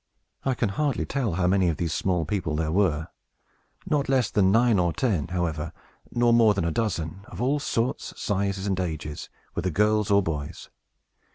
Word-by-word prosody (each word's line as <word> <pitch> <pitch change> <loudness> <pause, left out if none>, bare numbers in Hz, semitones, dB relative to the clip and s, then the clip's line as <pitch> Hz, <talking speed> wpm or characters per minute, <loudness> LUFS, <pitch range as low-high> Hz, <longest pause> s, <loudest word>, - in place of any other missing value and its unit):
I 135 -1 +1
can 115 -3 0
hardly 140 +8 -1
tell 125 - -1
how 90 +1 0
many 95 -1 +3
of 80 - -1
these 85 -2 -1
small 90 -4 0
people 80 -4 -2
there 80 0 -1
were; 80 -4 +1 0.8
not 145 -3 0
less 130 -4 +2
than 95 -2 +3
nine 115 -1 +4
or 85 -1 +2
ten, 90 - 0
however, 85 -3 -2 0.4
nor 120 0 +3
more 115 -3 +5
than 95 - 0
a 85 - 0
dozen, 90 -3 -2
of - - -10
all 135 +5 +1
sorts, 125 -3 -1
sizes, 100 -2 -1
and 95 -2 0
ages, 80 -4 -4 0.2
whether 90 - -1
girls 105 +3 +2
or 100 0 +4
boys. 75 -4 -5
95 Hz, 180 wpm, -26 LUFS, 85-115 Hz, 0.8 s, more